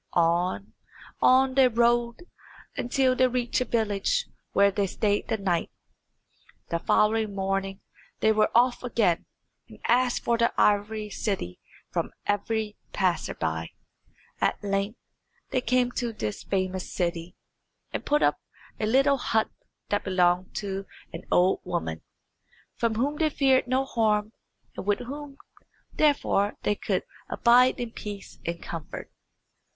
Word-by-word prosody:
On, 175 +3 +1 0.5
on 260 +1 +5
they 265 -1 +6
rode, 235 +2 +1 0.5
until 255 +1 +1
they 255 0 +4
reached 250 0 -1
a - - +1
village 225 - 0 0.3
where 200 0 +4
they 200 0 0
stayed 205 +2 0
the 225 - 0
night. 180 -4 0 1.0
The 170 - -1
following 215 +2 +2
morning 195 0 -2 0.4
they 220 - +4
were 215 0 +3
off 245 +1 +4
again, 220 -8 +1 0.4
and - - -13
asked 245 +1 +2
for 235 -1 +1 0.2
Ivory 210 +1 +2
City 190 - -3 0.3
from - - -1 0.2
every 210 +1 -1
passer 185 -3 0
by. 80 +1 -2 0.7
At - - 0
length 200 +2 -1 0.5
they 255 - +1
came 250 +1 +2
to 240 -1 -2
this 110 - -4
famous 185 -1 -2
city, 170 -1 -2 0.6
and - - -3
put 295 +1 +2
up - - +2 0.4
at 215 - 0
a - - 0
little 275 +2 +4
hut 220 -3 0 0.4
that 205 - 0
belonged 180 -1 +1
to 195 -1 -4 0.3
an 165 - -7
old 180 +2 +3
woman, 80 0 -3 0.7
from 230 -2 0
whom 280 +6 0
they 315 0 +2
feared 265 -3 +3
no 260 +2 +1
harm, 215 -3 +1 0.4
and - - -5
with 205 - +2
whom, 280 +2 -7 0.6
therefore, 280 -9 +2
they 210 - +2
could - - -1 0.3
abide 250 +2 +4
in 240 -2 -4
peace 205 -3 -8
and 170 0 -3
comfort. 165 -3 -7
215 Hz, 135 wpm, -27 LUFS, 195-245 Hz, 1.0 s, they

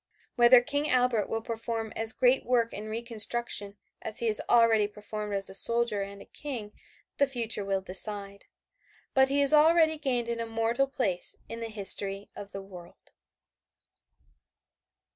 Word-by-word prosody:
Whether 240 0 +6
King 290 +2 -2
Albert 250 -4 +1
will 225 0 -4
perform 225 -1 -5
as 225 0 +2
great 250 +3 +1
work 235 -2 0
in 215 +1 -8
reconstruction 225 -2 -1 0.2
as 220 - -3
he 235 - 0
has 215 -2 +2
already 225 -3 +4
performed 210 0 -7
as 195 -1 +3
a 190 - -7
soldier 230 +1 +3
and 200 0 -8
a - - -22
King 245 -8 -7 0.5
the 280 - +2
future 230 -5 -4
will 195 -1 -2
decide, 200 +1 0 0.7
but 265 0 +3
he 280 +1 +1
has 280 +1 +7
already 315 +1 +4
gained 250 -5 -2
an 235 0 -4
immortal 230 +3 -1
place 200 -10 0
in 230 - -8
the 230 0 -6
history 200 -1 0
of 200 0 -10
the 195 0 -8
world. 180 -3 -15
225 Hz, 155 wpm, -27 LUFS, 205-245 Hz, 0.7 s, has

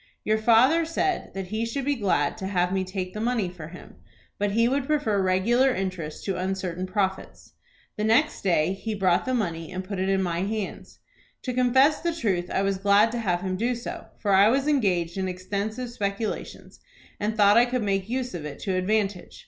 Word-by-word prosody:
'" - - -48
"Your 215 0 +2
father 245 +9 +5
said 335 +3 -1
that 190 -2 -5
he 220 +2 -2
should 240 +4 -3
be 285 - +2
glad 185 - +1
to 190 -3 -4
have 180 -1 0
me 190 -1 +1
take 185 -1 -5
the 215 - -5
money 230 -5 0
for 170 -4 -9
him, 180 +3 -13 0.4
but 205 -1 0
he 230 +2 +3
would 270 +1 0
prefer 255 -10 +1
regular 235 +8 +2
interest 185 -5 -4
to 195 -2 -1
uncertain 185 -1 -3
profits. 190 0 -3 0.4
The 210 - -1
next 225 +8 +2
day 175 -2 +2
he 215 +2 -4
brought 185 -3 +2
the 255 - 0
money, 165 -7 -3
and 185 0 -4
put 190 0 -5
it 190 +1 0
in 195 -1 +2
my 170 -2 -1
hands. 205 +1 -4 0.5
To 255 - -3
confess 260 +4 +3
the 340 -1 -1
truth 185 - -1
I 195 - 0
was 195 -1 0
glad 205 +3 +4
to 240 - -3
have 180 -6 0
him 185 0 -2
do 240 +4 0
so, 235 - -7
for 200 -2 0
I 195 +2 +6
was 270 +4 +1
engaged 190 - +1
in 190 - -1
extensive 205 +6 -4
speculations, 205 -1 -4 0.4
and 215 +1 -2
thought 205 -1 +6
I 235 +1 +6
could 250 -1 -2
make 195 0 -1
use 250 -1 -2
of 170 -4 -5
it 150 -2 -6
to 195 - -2
advantage. 195 0 -1
200 Hz, 210 wpm, -25 LUFS, 185-235 Hz, 0.5 s, I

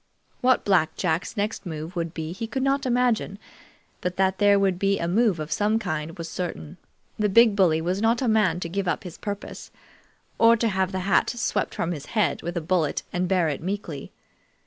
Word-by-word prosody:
What 255 0 +2
Black 175 -6 +2
Jack's 180 +5 -2
next 210 +2 -2
move 160 0 -6
would 170 -1 -2
be 160 -1 -5
he 210 +6 -5
could 260 +3 -2
not 275 0 +1
imagine, 245 -5 +1 0.6
but 180 0 -3
that 190 0 +1
there 205 -1 +5
would 190 -2 +1
be 195 0 +2
a 170 - -2
move 200 -1 +2
of 155 0 -5
some 210 +6 +2
kind 160 -6 -4
was 165 -1 -5
certain. 160 - -5 0.4
The 210 -1 +2
big 225 +1 +6
bully 170 -5 +3
was 180 +4 -1
not 230 +2 +2
a 255 - 0
man 210 -6 +2
to 170 - -2
give 195 +2 -3
up - - -1
his 180 -3 -9
purpose, 205 -1 -6 0.7
or 230 0 +6
to 230 0 +1
have 190 -1 0
the 190 -1 -2
hat 195 +2 +2
swept 240 -1 -2
from 170 - -1
his 145 -4 -6
head 185 -9 +2
with 175 +1 -4
a - - -1
bullet 160 -3 0
and 180 0 0
bear 180 -3 +2
it 145 -3 -3
meekly. 175 -6 -5
190 Hz, 210 wpm, -25 LUFS, 170-215 Hz, 0.7 s, big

